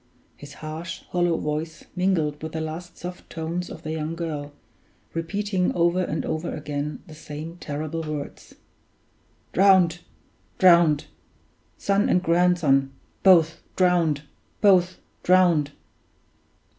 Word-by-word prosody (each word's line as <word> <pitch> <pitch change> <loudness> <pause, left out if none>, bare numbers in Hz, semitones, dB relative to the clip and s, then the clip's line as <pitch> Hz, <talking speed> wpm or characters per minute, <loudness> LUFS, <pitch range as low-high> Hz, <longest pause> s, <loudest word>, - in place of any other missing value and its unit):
His 145 0 -12
harsh, 160 +2 -6
hollow 175 -2 +1
voice 155 +1 -4
mingled 170 -6 0
with 160 0 -6
the 160 - -2
last 160 +3 -6
soft 180 0 -8
tones 165 +2 -4
of 160 - -10
the 155 - -4
young 160 +1 -3
girl, 150 -4 -4 0.6
repeating 185 +3 -1
over 175 +1 +2
and 160 -3 -2
over 160 +2 -3
again 150 0 -4
the 160 - -12
same 155 +2 -8
terrible 155 +1 -4
words, 155 -2 -7 1.0
"Drowned! 185 -3 +5 0.6
drowned! 170 -5 +5 0.7
Son 200 +1 +1
and 180 - +2
grandson, 165 -6 +3 0.3
both 165 -4 +5
drowned! 170 -5 +2 0.4
both 185 -3 +4 0.2
drowned!" 175 -5 +4
165 Hz, 115 wpm, -24 LUFS, 155-180 Hz, 1.0 s, Drowned